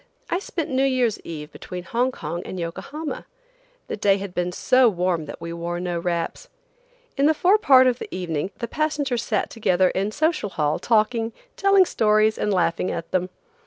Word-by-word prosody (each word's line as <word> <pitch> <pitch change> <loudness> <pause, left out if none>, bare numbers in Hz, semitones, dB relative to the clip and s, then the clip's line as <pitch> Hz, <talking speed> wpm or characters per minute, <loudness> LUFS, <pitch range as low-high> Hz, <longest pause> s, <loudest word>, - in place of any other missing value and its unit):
I 350 - +1
spent 335 -5 -4
New 260 0 +1
Year's 255 -5 +1
eve 150 -2 -8
between 180 -1 -8
Hong 245 +6 0
Kong 170 -6 -5
and 185 - -6
Yokohama. 280 - -5 0.6
The - - -3
day 200 -1 +3
had 195 -2 -6
been 180 0 -1
so 255 +6 +4
warm 180 -4 -1
that - - -8
we 170 0 -6
wore 170 +1 -4
no 175 -1 -2
wraps. 170 - -3 0.7
In 280 +1 +4
the 315 - +3
forepart 350 -9 +5
of 250 -1 +2
the - - -6
evening 175 -2 -3
the 235 - -4
passengers 290 -3 -1
sat 215 -4 -1
together 185 -5 +2
in 195 +2 -1
Social 310 -4 0
Hall 150 -4 0
talking, 225 0 +1 0.2
telling 395 -1 +5
stories 215 -5 +2
and 210 - 0
laughing 180 -1 +1
at 165 -1 -5
them. 185 0 0
210 Hz, 180 wpm, -23 LUFS, 175-260 Hz, 0.7 s, forepart